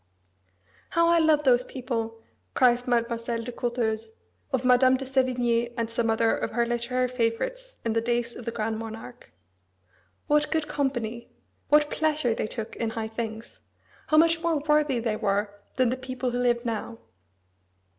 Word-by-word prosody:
"How 335 0 +3
I 340 0 +5
love 310 -2 +4
those 250 -2 +4
people!" 230 -4 -4 0.3
cries 245 -1 +3
Mademoiselle 235 -1 0
de 245 - -5
Courteheuse, 230 -2 -2 0.4
of 260 -1 0
Madame 255 +1 +5
de 270 - -6
Sévigné 245 -3 +1
and 230 -1 -2
some 230 0 0
other 225 0 +2
of - - -2
her 235 +1 +2
literary 240 +2 0
favourites 260 - -2
in 225 - +1
the 225 - +1
days 240 0 -1
of 240 - -9
the 235 - -2
Grand 220 -1 -2
Monarch. 225 +2 -9 0.9
"What 300 0 +2
good 315 -2 0
company! 240 -6 -2 0.4
What 300 0 +4
pleasure 305 -6 +1
they 220 - -2
took 220 -1 -6
in 230 - -1
high 220 0 -4
things! 225 0 -6 0.5
How 310 - +3
much 330 +1 +5
more 335 -2 +1
worthy 300 -4 +3
they 225 -2 -1
were 200 0 0 0.2
than 255 -2 +3
the 255 - -1
people 255 -1 -3
who 245 - -2
live 240 -1 +1
now!" 230 0 -3
240 Hz, 165 wpm, -26 LUFS, 230-265 Hz, 0.9 s, I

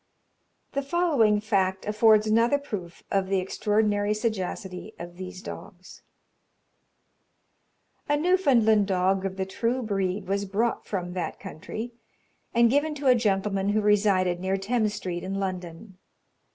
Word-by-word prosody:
The 280 - -1
following 280 -9 +2
fact 190 -3 0
affords 215 0 +4
another 230 +5 +3
proof 195 -11 -7
of 195 -1 +1
the 195 0 +1
extraordinary 205 +2 0
sagacity 210 -2 -4
of 175 0 -9
these 185 0 -8
dogs. 185 -2 -10 2.1
A 290 - +3
Newfoundland 260 - +3
dog 190 0 +1
of 190 0 -8
the 190 - -1
true 235 +6 -1
breed 195 -2 -2
was 200 +1 -1
brought 215 +5 -1
from 180 -3 -3
that 180 -2 -4
country, 215 +5 -7 0.6
and 235 0 +5
given 295 +3 +1
to 285 -1 -7
a 255 - +7
gentleman 195 -3 0
who 215 +1 +2
resided 200 -4 +2
near 190 +1 -1
Thames 215 +1 0
Street, 180 -3 -4
in 190 +1 -4
London. 185 0 -5
205 Hz, 135 wpm, -26 LUFS, 190-225 Hz, 2.1 s, a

